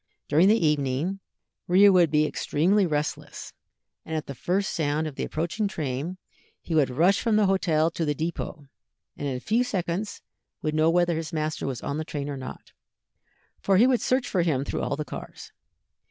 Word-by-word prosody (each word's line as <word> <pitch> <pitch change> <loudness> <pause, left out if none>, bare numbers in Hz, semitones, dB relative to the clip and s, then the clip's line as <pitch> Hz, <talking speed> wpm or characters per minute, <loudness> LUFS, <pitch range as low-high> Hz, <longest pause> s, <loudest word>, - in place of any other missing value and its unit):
During 160 +6 +4
the 215 +2 +5
evening, 150 +5 0 0.5
Rio 195 +3 +6
would 175 -3 +5
be 150 +1 +3
extremely 185 +7 +1
restless, 150 -1 -4 0.5
and 160 - -5
at 155 - -2
the 140 - -6
first 185 +8 -1
sound 155 -1 0
of 155 - -4
the - - -4
approaching 175 +7 -2
train 155 +1 -4 0.4
he 165 - -6
would 150 -4 +3
rush 170 +10 +3
from 230 -2 +1
the 210 -1 +4
hotel 170 -4 +2
to 165 - -3
the 150 -2 0
dépôt, 160 -2 -4 0.5
and 145 - -4
in 135 - -2
a - - -4
few 225 - +1
seconds 195 -3 -3 0.4
would 155 - -1
know 155 +1 +3
whether 175 0 +2
his 160 -1 -4
master 155 -2 -2
was 130 -4 -4
on 145 +1 -3
the - - -2
train 145 -2 -5
or 140 - -3
not, 130 -1 -9 0.9
for 195 -1 +2
he 225 - +6
would 255 -2 +3
search 255 0 +1
for 185 - +1
him 145 -5 0
through - - -3
all - - -1
the 150 +1 -4
cars. - - -9
160 Hz, 195 wpm, -26 LUFS, 150-190 Hz, 0.9 s, Rio